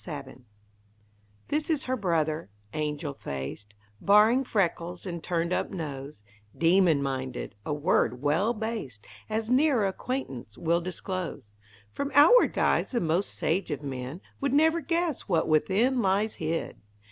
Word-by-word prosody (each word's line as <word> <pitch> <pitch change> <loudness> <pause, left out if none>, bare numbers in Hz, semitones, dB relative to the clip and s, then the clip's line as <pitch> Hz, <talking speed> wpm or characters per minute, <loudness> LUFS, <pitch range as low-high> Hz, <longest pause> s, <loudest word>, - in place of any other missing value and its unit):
SABIN 140 -6 -8 1.0
This 300 +2 -1
is 310 -4 +1
Her 255 - -1
brother; 165 - -1 0.2
angel 150 -1 -3
faced, 100 - -7 0.3
Barring 215 +6 +5
freckles 175 -6 -1
and 170 -3 -5
turned 170 0 -1
up - - -1
nose, 145 - -6 0.3
Demon 170 -3 +4
minded 130 -3 -4
a - - -1
word 145 -5 +1
well 150 - +2
based, 215 - -5 0.2
As 220 +1 -2
nearer 260 -4 +4
acquaintance 190 - -4
will 170 +1 +1
disclose. 185 - -5 0.4
From 280 - -3
outward 330 +13 +7
guise - - +2
the 245 - 0
most 170 +3 0
sage 180 +3 0
of 150 -1 -4
men 135 +4 -5 0.2
Would 275 -1 -1
never 320 +3 +4
guess 335 -4 -1
what 165 -3 +2
within 205 - +2
lies 200 +2 +1
hid! 160 -5 -3
175 Hz, 135 wpm, -28 LUFS, 150-225 Hz, 1.0 s, outward